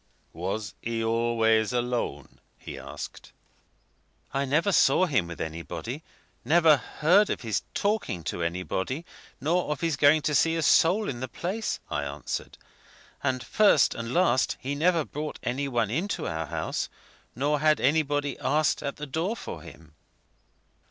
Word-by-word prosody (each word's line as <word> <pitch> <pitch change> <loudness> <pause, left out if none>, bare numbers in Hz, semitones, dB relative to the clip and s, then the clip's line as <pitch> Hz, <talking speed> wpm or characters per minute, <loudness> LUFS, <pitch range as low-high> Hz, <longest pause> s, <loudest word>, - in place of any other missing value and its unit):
"Was 95 +6 -3
he 115 -1 -2
always 115 -1 +2
alone?" 120 - -2 0.2
he - - -8
asked. - - -9 1.0
"I 140 +1 0
never 155 +9 +2
saw 185 - +5
him 130 - +1
with 85 - -8
anybody, 85 - -5 0.4
never 160 -1 +5
heard 180 +10 +3
of - - -2
his 110 -5 -1
talking 200 - -1
to 85 - -3
anybody, 90 - -2 0.3
nor 165 +5 0
of 150 - -3
his 165 -3 +1
going 145 +2 +5
to 150 - 0
see 165 +3 +3
a 165 - 0
soul 180 +8 +4
in 120 - -4
the 130 - -3
place," 190 - -3
I - - 0
answered; - - -5 0.6
"and 130 -2 -1
first 200 -10 +4
and 115 0 -5
last, 170 -6 +2
he 135 +2 -3
never 165 +1 +2
brought 150 +1 -5
any 135 +3 -1
one 120 -5 0
into 180 - -2
our 80 0 -3
house, - - -3 0.5
nor 145 +4 +1
had 155 0 +3
anybody 145 -1 +1
asked 150 +2 +1
at 140 -1 -3
the 150 - -6
door 165 - -2
for 80 - -7
him." 80 -1 -14
140 Hz, 150 wpm, -27 LUFS, 115-160 Hz, 1.0 s, saw